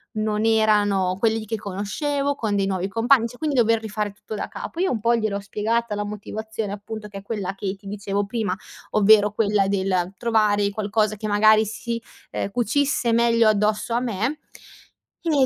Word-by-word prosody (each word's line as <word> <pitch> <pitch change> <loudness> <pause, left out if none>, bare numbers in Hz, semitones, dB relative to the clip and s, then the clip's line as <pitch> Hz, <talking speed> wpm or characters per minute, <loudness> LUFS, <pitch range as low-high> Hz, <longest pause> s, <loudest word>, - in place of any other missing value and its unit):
non 215 0 0
erano 205 -4 +3
quelli 225 +2 +1
di 215 - -7
che 225 - -2
conoscevo, 275 - -2
con 215 -6 -1
dei 195 -1 +1
nuovi 190 -1 -1
compagni, 230 +4 +3
cioè 245 +1 -13
quindi 305 -3 -1
dover 230 -2 +3
rifare 210 -1 -3
tutto 210 +1 -9
da - - -3
capo. 330 - -7
Io 375 - +2
un 235 - -1
po' 235 +2 +3
gliel'ho 215 -3 -1
spiegata 215 +2 -1
la 205 - -2
motivazione 210 0 -5
appunto, 210 +1 -7
che 200 -1 -9
è 195 - -7
quella 200 -3 -4
che 195 0 -3
ti 200 0 -15
dicevo 200 0 -2
prima, 210 -4 -1 0.4
ovvero 210 0 +5
quella 210 -2 +1
del 190 -2 0
trovare 210 -3 +2
qualcosa 215 +1 0
che 215 +1 -5
magari 215 +1 +5
si, 230 +2 -4 0.3
ehm, 200 - -3
cucisse 245 +2 +1
meglio 230 -1 +4
addosso 210 +2 +1
a 240 - +3
me. 235 +5 -1 0.9
E 295 -5 +4
215 Hz, 185 wpm, -23 LUFS, 200-230 Hz, 0.9 s, ovvero